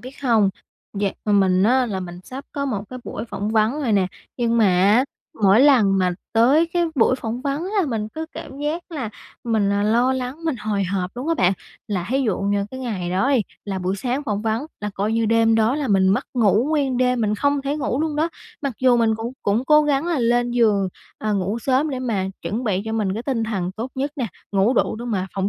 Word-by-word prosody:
biết 255 Hz, +2 st, -11 dB
hông, 225 Hz, -6 st, +3 dB, 0.5 s
dạo 200 Hz, -1 st, 0 dB
ừm, 205 Hz, -1 st, +4 dB
mình 185 Hz, -1 st, +3 dB
á 250 Hz, +4 st, +3 dB
là 195 Hz, -4 st, -3 dB
mình 175 Hz, -1 st, -7 dB
sắp 265 Hz, +2 st, -8 dB
có 280 Hz, -, -2 dB
một 205 Hz, -7 st, -2 dB
cái 255 Hz, -, -6 dB
buổi 215 Hz, -, -5 dB
phỏng 210 Hz, -3 st, -4 dB
vấn 220 Hz, +1 st, +3 dB
rồi 240 Hz, -5 st, 0 dB
nè. 195 Hz, -3 st, +3 dB, 0.3 s
Nhưng 235 Hz, -1 st, +1 dB
mà 225 Hz, -, +5 dB
á, 195 Hz, +7 st, +4 dB, 0.4 s
mỗi 200 Hz, +3 st, +6 dB
lần 235 Hz, -9 st, +5 dB
mà 180 Hz, -1 st, +2 dB, 0.2 s
tới 265 Hz, +9 st, +4 dB
cái 345 Hz, -1 st, +2 dB
buổi 255 Hz, -1 st, +3 dB
phỏng 235 Hz, -1 st, -4 dB
vấn 285 Hz, +3 st, -2 dB
là 390 Hz, -2 st, 0 dB
mình 220 Hz, -5 st, -2 dB
cứ 320 Hz, +8 st, -6 dB
cảm 275 Hz, -1 st, -9 dB
giác 300 Hz, +4 st, -2 dB
là 275 Hz, -9 st, -4 dB, 0.4 s
mình, 215 Hz, -4 st, +1 dB
à, 200 Hz, 0 st, +1 dB
lo 235 Hz, +5 st, +3 dB
lắng, 260 Hz, +5 st, -4 dB
mình 320 Hz, -5 st, 0 dB
hồi 210 Hz, -3 st, -1 dB
hộp 180 Hz, 0 st, -2 dB
luôn 255 Hz, +5 st, -5 dB
á 330 Hz, -, +3 dB
bạn. 185 Hz, -, +3 dB, 0.4 s
Là 185 Hz, -4 st, -2 dB
thí 270 Hz, +2 st, +2 dB
dụ 215 Hz, -7 st, 0 dB
như 200 Hz, 0 st, 0 dB
cái 260 Hz, -, -7 dB
ngày 200 Hz, -9 st, -3 dB
đó 195 Hz, +9 st, +1 dB
đi, 265 Hz, -4 st, +4 dB, 0.2 s
là 195 Hz, -2 st, -3 dB
buổi 185 Hz, +1 st, -1 dB
sáng 255 Hz, +7 st, -2 dB
phỏng 210 Hz, -5 st, -2 dB
vấn 225 Hz, +5 st, -1 dB
là 210 Hz, 0 st, -3 dB
coi 205 Hz, +3 st, -1 dB
như 225 Hz, 0 st, +1 dB
đêm 225 Hz, 0 st, +3 dB
đó 225 Hz, +3 st, +3 dB
là 290 Hz, -2 st, -2 dB
mình 190 Hz, -2 st, +4 dB
mất 195 Hz, -, +2 dB
ngủ 225 Hz, -1 st, +3 dB
nguyên 280 Hz, -5 st, +1 dB
đêm, 250 Hz, -1 st, +2 dB
mình 210 Hz, -1 st, +1 dB
không 285 Hz, +5 st, +1 dB
thể 280 Hz, +2 st, -1 dB
ngủ 275 Hz, -2 st, -1 dB
luôn 310 Hz, -1 st, -1 dB
đó. 315 Hz, +2 st, +1 dB, 0.3 s
Mặc 280 Hz, -2 st, -1 dB
dù 255 Hz, -2 st, +5 dB
mình 225 Hz, -2 st, +3 dB
cũng 225 Hz, +2 st, -5 dB
cũng 210 Hz, +5 st, +1 dB
cố 300 Hz, +1 st, +5 dB
gắng 290 Hz, +1 st, +1 dB
là 340 Hz, -4 st, 0 dB
lên 240 Hz, 0 st, +2 dB
giường, 215 Hz, -5 st, +2 dB, 0.3 s
à, 215 Hz, 0 st, -1 dB
ngủ 200 Hz, +3 st, -1 dB
sớm 265 Hz, +5 st, +1 dB
để 265 Hz, -, -3 dB
mà 225 Hz, -7 st, -1 dB, 0.2 s
chuẩn 230 Hz, +5 st, -3 dB
bị 200 Hz, -4 st, 0 dB
cho 220 Hz, -, -4 dB
mình 210 Hz, -4 st, 0 dB
cái 225 Hz, -, -4 dB
tinh 245 Hz, -4 st, -1 dB
thần 195 Hz, -5 st, -2 dB
tốt 230 Hz, +6 st, -5 dB
nhất 275 Hz, +2 st, -2 dB
nè, 255 Hz, -4 st, -1 dB, 0.3 s
ngủ 200 Hz, +4 st, +3 dB
đủ -, -, +1 dB
để 235 Hz, -, -6 dB
mà 200 Hz, -6 st, -1 dB
phỏng 195 Hz, 0 st, 0 dB
230 Hz, 245 wpm, -22 LUFS, 200-265 Hz, 0.5 s, mỗi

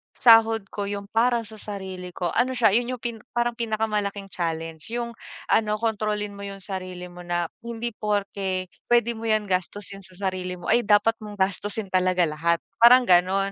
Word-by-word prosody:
sahod 225 Hz, -2 st, +6 dB
ko 205 Hz, -1 st, -3 dB
yung 200 Hz, 0 st, -5 dB
para 235 Hz, +1 st, +2 dB
sa 215 Hz, -1 st, -8 dB
sarili 190 Hz, -3 st, -6 dB
ko 175 Hz, -2 st, -1 dB
ano 260 Hz, +1 st, +1 dB
siya, 225 Hz, -5 st, +4 dB
yun 245 Hz, +3 st, +1 dB
yung 240 Hz, -, -16 dB
pin 235 Hz, -2 st, -3 dB, 0.2 s
parang 240 Hz, 0 st, 0 dB
pinakamalaking 210 Hz, -3 st, -2 dB
challenge. 165 Hz, -2 st, -4 dB
Yung 235 Hz, -1 st, -2 dB, 0.4 s
ano 210 Hz, -1 st, +3 dB
kontrolin 210 Hz, -2 st, -1 dB
mo 200 Hz, -, -7 dB
yung 195 Hz, -1 st, -7 dB
sarili 185 Hz, -2 st, -5 dB
mo 175 Hz, -, -12 dB
na 175 Hz, -1 st, -1 dB, 0.2 s
hindi 235 Hz, 0 st, -4 dB
porke 200 Hz, -3 st, -2 dB, 0.2 s
pwede 235 Hz, -1 st, +3 dB
mo 225 Hz, -, -7 dB
'yan 215 Hz, -1 st, +2 dB
gastusin 195 Hz, +2 st, -2 dB
sa 185 Hz, -1 st, -14 dB
sarili 180 Hz, -1 st, -5 dB
mo 175 Hz, -, -7 dB
ay 235 Hz, -1 st, +3 dB
dapat 215 Hz, +2 st, +4 dB
mong 210 Hz, -1 st, -8 dB
gastusin 200 Hz, +2 st, -1 dB
talaga 185 Hz, -1 st, +3 dB
lahat, 165 Hz, +2 st, 0 dB, 0.2 s
parang 250 Hz, +2 st, +8 dB
ganon. 190 Hz, 0 st, +3 dB
205 Hz, 180 wpm, -25 LUFS, 185-225 Hz, 0.4 s, parang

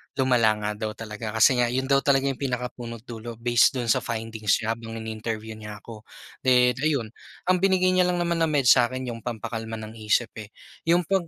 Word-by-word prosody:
lumala 125 Hz, -5 st, +3 dB
nga 105 Hz, -, 0 dB, 0.2 s
daw 110 Hz, -, -4 dB
talaga, 110 Hz, 0 st, -6 dB
kasi 125 Hz, +3 st, +5 dB
nga 120 Hz, -, +3 dB
'yon 130 Hz, +3 st, -2 dB
daw 135 Hz, -, +6 dB
talaga 135 Hz, -1 st, +2 dB
'yong 130 Hz, -, -9 dB
pinakapuno't 125 Hz, -3 st, -4 dB
dulo, 115 Hz, -1 st, -8 dB
based 120 Hz, +3 st, +3 dB
do'n 120 Hz, -3 st, 0 dB
sa -, -, +3 dB
findings 110 Hz, -2 st, -1 dB
niya 110 Hz, -, 0 dB
habang 115 Hz, 0 st, -6 dB
ini-interview 110 Hz, 0 st, -5 dB
niya 105 Hz, -1 st, -8 dB
ako. 110 Hz, -2 st, -11 dB, 0.3 s
Then, 125 Hz, -1 st, +4 dB
ayun, 140 Hz, -8 st, 0 dB, 0.4 s
ang 185 Hz, -, +2 dB
binigay 185 Hz, -1 st, +3 dB
niya 180 Hz, -1 st, +3 dB
lang 180 Hz, -, +1 dB
naman 170 Hz, -1 st, -1 dB
na 165 Hz, -, +3 dB
med 145 Hz, -3 st, +1 dB
sa'kin 125 Hz, 0 st, +3 dB
'yong 115 Hz, -, -7 dB
pampakalma 115 Hz, -1 st, -5 dB
ng 110 Hz, 0 st, -7 dB
isip, 110 Hz, +2 st, +1 dB
eh, 105 Hz, 0 st, -11 dB, 0.3 s
'yong 175 Hz, +2 st, +4 dB
pag 185 Hz, -1 st, 0 dB
120 Hz, 200 wpm, -25 LUFS, 110-135 Hz, 0.4 s, daw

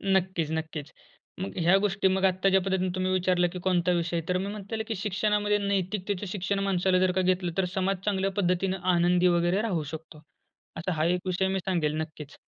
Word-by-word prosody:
नक्कीच, 180 Hz, -4 st, 0 dB
नक्कीच. 160 Hz, -2 st, -4 dB, 0.5 s
मग 190 Hz, 0 st, -5 dB
ह्या 175 Hz, +3 st, +4 dB
गोष्टी 195 Hz, -1 st, +1 dB
मग 190 Hz, -, +1 dB
आत्ताच्या 190 Hz, +1 st, +3 dB
पद्धतीने 185 Hz, -1 st, 0 dB
तुम्ही 185 Hz, 0 st, 0 dB
विचारलं 180 Hz, -1 st, +2 dB
की 180 Hz, -, -5 dB
कोणता 180 Hz, -1 st, +2 dB
विषय? 170 Hz, 0 st, -2 dB
तर 180 Hz, -, +2 dB
मग 195 Hz, +2 st, -3 dB
म्हणता 210 Hz, +1 st, -6 dB
येईल 220 Hz, -, -2 dB
की 220 Hz, -, -2 dB
शिक्षणामध्ये 210 Hz, +1 st, 0 dB
नैतिकतेचं 200 Hz, 0 st, -2 dB
शिक्षण 195 Hz, 0 st, -1 dB
माणसाला 185 Hz, 0 st, +2 dB
जर 185 Hz, 0 st, +3 dB
का -, -, +3 dB
घेतलं 180 Hz, -1 st, +1 dB
तर 190 Hz, -, +2 dB
समाज 190 Hz, 0 st, 0 dB
चांगल्या 195 Hz, -1 st, 0 dB
पद्धतीने 185 Hz, +1 st, 0 dB, 0.2 s
आनंदी 175 Hz, +1 st, +3 dB
वगैरे 175 Hz, +4 st, +1 dB
राहू 185 Hz, -8 st, -1 dB
शकतो. 155 Hz, -1 st, -12 dB, 0.6 s
असा 170 Hz, +3 st, -2 dB
हा 155 Hz, 0 st, 0 dB
एक -, -, -10 dB
विषय 185 Hz, +1 st, +1 dB
मी 190 Hz, 0 st, 0 dB
सांगेल 160 Hz, -5 st, 0 dB
नक्कीच. 155 Hz, 0 st, -8 dB
185 Hz, 190 wpm, -27 LUFS, 175-195 Hz, 0.6 s, ह्या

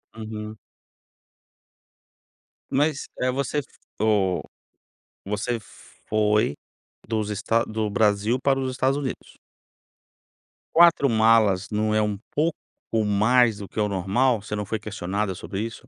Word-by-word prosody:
Uhum. 110 Hz, -1 st, -7 dB, 2.1 s
Mas, 145 Hz, +1 st, +1 dB, 0.2 s
eh, 130 Hz, 0 st, +2 dB
você 140 Hz, +2 st, -1 dB
f 145 Hz, -, -6 dB, 0.4 s
oh, 100 Hz, -5 st, +2 dB, 0.8 s
você 105 Hz, +4 st, -2 dB, 0.5 s
foi 105 Hz, -6 st, +2 dB, 0.5 s
dos 110 Hz, -1 st, -2 dB
esta 115 Hz, +3 st, +1 dB
do 110 Hz, -1 st, -2 dB
Brasil 105 Hz, +3 st, +2 dB
para 135 Hz, -1 st, +2 dB
os 130 Hz, -1 st, -1 dB
Estados 130 Hz, +2 st, 0 dB
Unidos? 140 Hz, -3 st, -6 dB, 1.4 s
4 170 Hz, -4 st, +6 dB
malas 110 Hz, -3 st, +3 dB
não 105 Hz, 0 st, 0 dB
é 110 Hz, -, +3 dB
um 105 Hz, -1 st, -1 dB
pouco 155 Hz, +2 st, +1 dB, 0.5 s
mais 110 Hz, +2 st, +3 dB
do 100 Hz, -2 st, -7 dB
que -, -, -6 dB
o 105 Hz, -, +2 dB
normal? 100 Hz, +5 st, +1 dB
Você 105 Hz, 0 st, -5 dB
não 105 Hz, 0 st, -3 dB
foi 110 Hz, +2 st, -3 dB
questionada 100 Hz, -2 st, -3 dB
sobre 95 Hz, +2 st, -5 dB
isso? 115 Hz, +3 st, -6 dB
110 Hz, 125 wpm, -24 LUFS, 105-125 Hz, 2.1 s, 4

